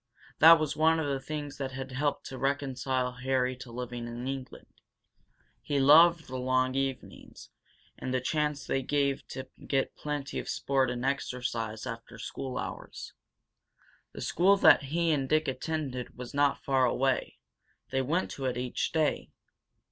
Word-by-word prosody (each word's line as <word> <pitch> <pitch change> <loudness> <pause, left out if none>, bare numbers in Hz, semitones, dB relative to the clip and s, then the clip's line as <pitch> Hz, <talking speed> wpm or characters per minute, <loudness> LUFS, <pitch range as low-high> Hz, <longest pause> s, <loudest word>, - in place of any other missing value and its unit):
That 165 +2 +10
was 155 -2 -1
one 160 +1 +3
of 160 - -1
the 140 -1 -1
things 145 0 -6
that 135 -1 -3
had 135 0 -6
helped 145 +3 -1
to 130 - -7
reconcile 130 -2 -1
Harry 130 0 0
to 125 -2 -10
living 120 0 -5
in 120 +2 -6
England. 135 -1 -6 1.0
He 145 -1 -1
loved 160 +4 +7
the 130 - -5
long 130 0 +1
evenings 135 -1 -5 0.5
and 130 - -4
the 130 - +1
chance 150 +2 -1
they 135 - 0
gave 140 0 0
to 130 0 -7 0.2
get 135 -1 0
plenty 145 -2 -4
of - - -6
sport 135 -2 +1
and 125 +1 -3
exercise 125 -5 -2
after 115 -2 -7
school 130 -2 -5
hours. - - -6 1.0
The - - -8
school 195 +4 +3
that 145 - +6
he 165 +4 +1
and 135 -3 0
Dick 155 0 +2
attended 135 -4 -4
was 125 -1 -8
not 145 0 +2
far 135 -2 +3
away; 130 +1 0 0.5
they 135 0 +1
went 165 +8 -1
to 135 - -5
it 125 -1 -1
each 125 0 -2
day. 155 -2 0
135 Hz, 160 wpm, -29 LUFS, 130-145 Hz, 1.0 s, That